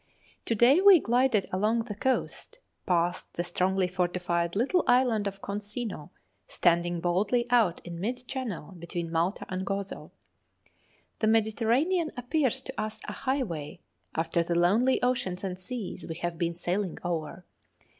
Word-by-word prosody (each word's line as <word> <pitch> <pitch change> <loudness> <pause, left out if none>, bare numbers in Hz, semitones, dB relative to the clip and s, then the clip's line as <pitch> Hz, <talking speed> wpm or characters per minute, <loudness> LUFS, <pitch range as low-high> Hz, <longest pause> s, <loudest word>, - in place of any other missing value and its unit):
To 230 - 0
day 255 - +6
we 390 -3 +9
glided 245 -5 +2
along 215 +5 +2
the 225 -2 -6
coast, 260 - -2 0.3
past 175 -1 0
the 175 - -1
strongly 185 +1 +1
fortified 175 -1 -1
little 275 - +2
island 245 -5 +3
of 195 0 -6
Consino, 205 -4 -5 0.4
standing 175 0 +1
boldly 200 +8 +1
out 220 -8 +3
in 170 -1 -7
mid 245 +6 -3
channel 240 - -4
between 170 -1 -5
Malta 170 +4 0
and 185 0 -3
Gozo. 195 0 -4 1.1
The 220 - +1
Mediterranean 235 - +2
appears 260 0 0
to 265 - -5
us 215 0 -4
a - - -4
highway 230 - -3 0.4
after 165 +1 +1
the 170 +1 -1
lonely 215 +10 +3
oceans 245 -8 0
and 185 -2 -2
seas 190 +3 -6
we 165 - -5
have 170 0 -4
been 170 -1 -1
sailing 180 +1 -2
over. 170 +1 -3
200 Hz, 145 wpm, -28 LUFS, 175-245 Hz, 1.1 s, we